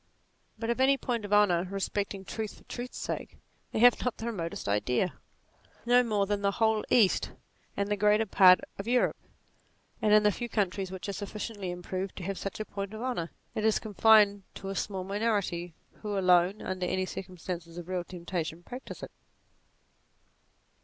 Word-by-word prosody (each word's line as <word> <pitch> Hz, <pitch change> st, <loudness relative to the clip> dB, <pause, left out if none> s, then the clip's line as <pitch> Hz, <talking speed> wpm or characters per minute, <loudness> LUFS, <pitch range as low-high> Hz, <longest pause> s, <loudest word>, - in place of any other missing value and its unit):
But 230 Hz, 0 st, -1 dB
of 235 Hz, -, -2 dB
any 275 Hz, +1 st, +5 dB
point 235 Hz, -5 st, -2 dB
of 205 Hz, -, -8 dB
honour 190 Hz, -4 st, +4 dB
respecting 195 Hz, 0 st, -3 dB
truth 220 Hz, +1 st, -5 dB
for -, -, -18 dB
truth's 245 Hz, 0 st, -7 dB
sake, -, -, -5 dB, 0.3 s
they -, -, -3 dB
have 245 Hz, +2 st, +6 dB
not 250 Hz, -, -1 dB
the 225 Hz, -, -6 dB
remotest 175 Hz, -, -4 dB
idea; 125 Hz, -, +1 dB, 0.7 s
no 245 Hz, +1 st, +6 dB
more 210 Hz, -4 st, +1 dB
than 205 Hz, 0 st, -1 dB
the 200 Hz, 0 st, +1 dB
whole 220 Hz, -1 st, +2 dB
East, 215 Hz, -6 st, +3 dB, 0.4 s
and 200 Hz, -, 0 dB
the 205 Hz, -, +1 dB
greater 210 Hz, +2 st, +3 dB
part 185 Hz, -2 st, +7 dB, 0.2 s
of 200 Hz, -, -5 dB
Europe: 245 Hz, +1 st, +2 dB, 0.9 s
and 215 Hz, -, +2 dB
in 210 Hz, 0 st, +7 dB
the 210 Hz, -, +5 dB
few 240 Hz, +4 st, -5 dB
countries 195 Hz, -3 st, -1 dB
which 185 Hz, 0 st, -6 dB
are 200 Hz, -, -2 dB
sufficiently 205 Hz, 0 st, -5 dB
improved 185 Hz, +2 st, -4 dB
to 185 Hz, -, -7 dB
have 195 Hz, +1 st, -3 dB
such 195 Hz, -, -5 dB
a 215 Hz, -, -3 dB
point 200 Hz, +1 st, -5 dB
of 215 Hz, -, -7 dB
honour, 240 Hz, -10 st, -2 dB, 0.2 s
it 215 Hz, -, -2 dB
is 220 Hz, -1 st, +4 dB
con 215 Hz, -2 st, -7 dB
fined 210 Hz, -1 st, +6 dB
to 195 Hz, -, -6 dB
a 195 Hz, -, -4 dB
small 190 Hz, -1 st, -2 dB
minority, 195 Hz, -4 st, -1 dB, 0.3 s
who 210 Hz, -2 st, -2 dB
alone, 180 Hz, +1 st, +3 dB
under 185 Hz, -1 st, -2 dB
any 185 Hz, +1 st, 0 dB
cir -, -, -5 dB
cumstances 175 Hz, -2 st, -7 dB
of 175 Hz, -1 st, -7 dB
real 180 Hz, -1 st, -2 dB
temptation 175 Hz, -2 st, -5 dB
practise 250 Hz, +6 st, -8 dB
it. -, -, -7 dB
200 Hz, 185 wpm, -29 LUFS, 185-215 Hz, 0.9 s, part